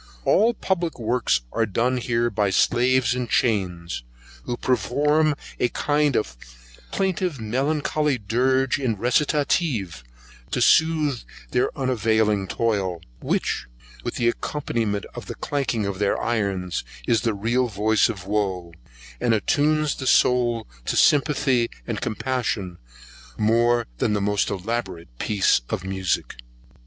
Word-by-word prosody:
All 230 +4 +4
public 175 -5 -1
works 115 - +1
are 115 -1 0
done 120 +6 0
here 120 -1 0
by 105 -1 +1
slaves 125 +5 +3
in 125 -1 -2
chains, 90 - 0 0.4
who 120 - -3
perform 150 +4 +2 0.2
a 120 - +2
kind 145 -1 +1
of 60 - -1 0.6
plaintive 185 -6 -1
melancholy 140 +5 0
dirge 130 +5 +1
in 120 -6 -1
recitative, 125 - 0 0.5
to - - -1
sooth 155 -5 +3 0.3
their 125 - +2
unavailing 110 -6 +1
toil, 95 -6 -1 0.2
which, - - -1 0.4
with - - -4
the 120 - +1
accompanyment 115 -9 -2
of - - -8
the - - -6
clanking 125 -7 -2
of 100 -1 -3
their 100 -1 +1
irons, 100 -6 -1 0.2
is 115 - +2
the 115 -3 0
real 120 +5 +1
voice 110 +1 +2
of 100 -5 -6
wo, 95 -4 -2 0.5
and 115 - +2
attunes 150 +6 +1
the 130 - -5
soul 120 -4 +3 0.2
to - - -1
sympathy 140 -4 +3 0.2
and 115 -3 -4
compassion, 110 -6 -2 0.6
more 120 +2 +3
than 105 - +1
the 105 - +1
most 100 0 +1
elaborate 95 - -4
piece 100 -10 +2
of 90 - -3
music. 95 -7 -2
115 Hz, 125 wpm, -23 LUFS, 100-135 Hz, 0.6 s, All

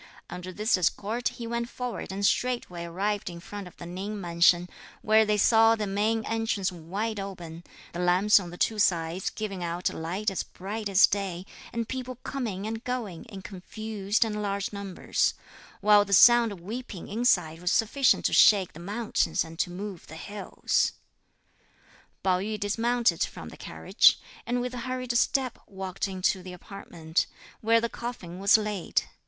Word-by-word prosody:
Under 180 +1 -6
this 210 +3 +1
escort 215 +7 0
he 235 - -5
went 235 +1 -2
forward 250 -6 -5
and 200 +1 -1
straightway 220 -9 0
arrived 200 +4 -2
in 170 -1 -8
front 200 +2 -8
of 180 - -15
the 175 - -9
Ning 195 +4 -5
mansion, 175 0 +3 0.4
where 220 +1 +5
they 210 0 +1
saw 225 +2 +5
the 215 -2 -2
main 215 +3 0
entrance 225 -4 -1
wide 195 +6 -4
open, 175 -4 -7 0.3
the 170 - -5
lamps 180 +4 +5
on 180 -3 -7
the 175 - -9
two 220 +3 +1
sides 170 -1 +1
giving 195 -4 -5
out 175 +1 -1
a - - -9
light 185 +6 -2
as 190 - -2
bright 205 +3 -5
as 195 +1 +7
day, 190 -3 -3 0.3
and 230 -1 -3
people 255 0 -5
coming 220 -8 -3
and 225 +1 -4
going 235 -8 -4
in 200 -5 -10
confused 210 +2 -2
and 210 -1 -3
large 200 0 -2
numbers; 200 -2 -1 0.5
while 205 0 +6
the 200 0 -3
sound 240 +2 +7
of 190 -4 -9
weeping 215 -1 -7
inside 180 -8 +1
was 180 - 0
sufficient 255 +4 +3
to - - +2
shake 195 -4 +6
the 155 - -11
mountains 205 +6 0
and 165 0 -11
to - - +1
move 190 0 -7
the 160 - -10
hills. 205 +5 -1 1.3
Pao 185 -1 +3
yü 210 +2 -3
dismounted 235 +4 +1
from - - -6
the - - -11
carriage; - - +3 0.3
and 245 +1 0
with 250 0 -3
hurried 255 0 -3
step, 260 0 +1
walked 190 0 -4
into 190 0 0
the 180 0 -9
apartment, 170 -3 -3 0.3
where 230 +1 +4
the 235 - 0
coffin 225 -8 -7
was 200 +2 +6
laid. 210 -4 -1
200 Hz, 170 wpm, -27 LUFS, 180-225 Hz, 1.3 s, as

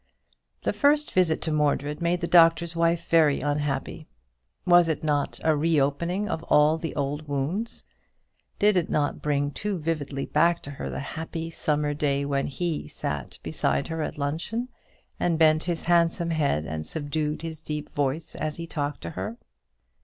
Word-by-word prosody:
The - - 0
first 295 +1 +3
visit 180 -4 +2
to 160 - 0
Mordred 150 0 0
made 170 +1 +1
the 170 - -1
Doctor's 165 -1 +5
Wife 165 0 +1
very 155 -4 +4
unhappy. 145 +1 -2 0.6
Was 175 -2 +6
it 160 - -2
not 145 -2 0
a 155 -1 +3
reopening 165 +5 +1
of 160 - -2
all 150 +2 +4
the 165 - -5
old 145 +2 -2
wounds? 150 +11 -2 0.7
Did 205 -1 +4
it 175 - 0
not 145 -1 0
bring 145 -1 0
too 205 +6 -3
vividly 150 -4 -3
back 170 +3 +2
to 145 - -7
her 100 - -5
the 65 0 -4
happy 165 - -5
summer 150 -2 0
day 140 -2 0
when 140 -1 0
he 165 +2 -2
had 75 - -12
sat - - -4
beside 70 0 0
her 160 0 -3
at - - -4
luncheon, 165 - -2 0.5
and 170 -2 +1
bent 155 -1 +4
his 170 -2 -2
handsome 170 0 +2
head 140 - +1
and 80 -1 -5
subdued 150 0 -2
his 160 -2 -6
deep 150 -1 -5
voice 145 +3 -1
as 155 -1 -3
he 170 - -5
talked 145 -3 -3
to 85 - -5
her? 100 +7 -5
155 Hz, 170 wpm, -26 LUFS, 145-170 Hz, 0.7 s, Was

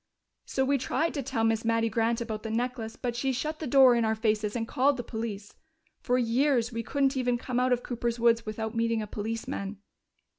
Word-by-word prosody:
So 265 - 0
we 280 +1 +2
tried 320 +6 0
to 285 - -2
tell 250 -3 -2
Miss 225 0 +2
Mattie 230 0 +2
Grant 230 +1 0
about 220 -2 -4
the 225 - -5
necklace, 230 0 -2
but 245 -2 -3
she 265 +3 0
shut 305 +5 -3
the 310 - -4
door 260 -1 +7
in 235 -1 +2
our 220 0 +1
faces 215 -1 0
and 225 -1 -2
called 270 +3 +2
the 245 - -4
police. 220 -3 -5 0.5
For 250 0 +1
years 245 0 +2
we 230 0 -3
couldn't 270 +3 0
even 250 -2 +1
come 245 0 -2
out 255 0 +2
of 245 -1 +1
Cooper's 235 -1 -2
woods 230 0 +3
without 220 0 -4
meeting 230 -1 0
a - - -4
policeman. 210 -1 -4
235 Hz, 215 wpm, -28 LUFS, 225-255 Hz, 0.5 s, door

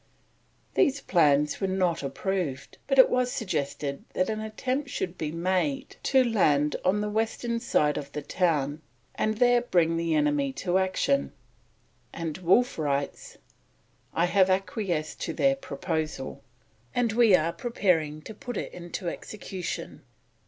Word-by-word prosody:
These 280 0 +3
plans 150 -3 +3
were 195 - +1
not 185 -3 0
approved, 140 0 -3
but 270 - +1
it 260 - +9
was 250 0 +1
suggested 140 - -3
that 185 - +1
an 215 - -3
attempt 255 +6 -3
should 180 -8 -3
be 155 -4 -3
made 170 -4 -1
to 265 -1 +4
land 150 - +2
on 190 +3 +2
the 210 - -1
western 225 +2 -1
side 150 -10 +1
of 140 -1 -9
the 150 - -4
town 150 -4 0 0.3
and 215 0 -1
there 245 0 +4
bring 170 -8 +2
the 165 -1 0
enemy 145 -2 +1
to 180 +5 0
action, 190 +9 0 0.8
and 165 0 -5
Wolfe 190 +5 +3
writes: 140 -2 -2 0.7
"I 170 - +2
have 190 +1 +3
acquiesced 185 -4 -1
in - - -3
their 275 0 +3
Proposal, 155 - -4 0.5
and 235 -2 +1
we 225 -4 +6
are 165 0 +1
preparing 165 -10 0
to 220 - -8
put 245 +1 -6
it - - -4
into 175 +1 -6
execution." 190 0 -5
180 Hz, 145 wpm, -27 LUFS, 150-220 Hz, 0.8 s, it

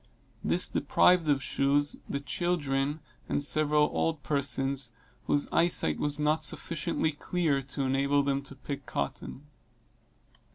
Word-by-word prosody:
This - - 0
deprived 180 -3 +3
of 140 -2 +2
shoes 145 +1 +1
the 140 - -2
children, 145 -2 -1 0.3
and 145 - +1
several 150 0 +3
old 160 -3 -1
persons, 135 -2 0 0.4
whose 145 - +1
eye 170 - +4
sight 80 - +1
was 145 0 0
not 150 +1 +1
sufficiently 160 -1 0
clear 150 -1 -1
to 135 +1 -4
enable 140 +2 +2
them 140 0 0
to 140 0 -9
pick 140 0 -7
cotton. 70 - -4
145 Hz, 130 wpm, -29 LUFS, 135-150 Hz, 0.4 s, eye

